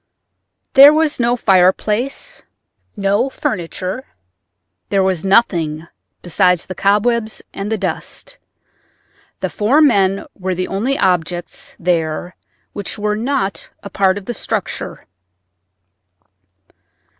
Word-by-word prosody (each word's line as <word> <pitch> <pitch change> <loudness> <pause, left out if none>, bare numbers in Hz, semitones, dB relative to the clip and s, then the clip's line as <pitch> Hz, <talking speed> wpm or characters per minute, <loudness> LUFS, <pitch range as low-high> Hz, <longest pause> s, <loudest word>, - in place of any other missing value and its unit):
There 275 +1 +10
was 310 -2 +1
no 240 0 +2
fireplace, 210 +5 +1 0.6
no 205 +6 +1
furniture; 185 +1 -4 0.9
there 195 -1 +2
was 185 -4 0
nothing: 170 -6 +1 0.4
besides 180 0 +2
the 185 - -6
cobwebs 215 +4 +1
and 200 +2 -5
the 220 - +1
dust, 195 -2 -5 1.0
the - - -1
four 230 +8 +2
men 200 -10 +3
were 185 -1 -3
the 185 +1 -2
only 240 +8 -1
objects 175 -1 -1
there 170 0 -1 0.4
which 205 +1 -5
were 210 0 -1
not 230 -3 -2
a 200 - -8
part 190 0 +2
of 200 - -8
the 240 - -3
structure. - - -4
195 Hz, 110 wpm, -17 LUFS, 185-230 Hz, 1.0 s, There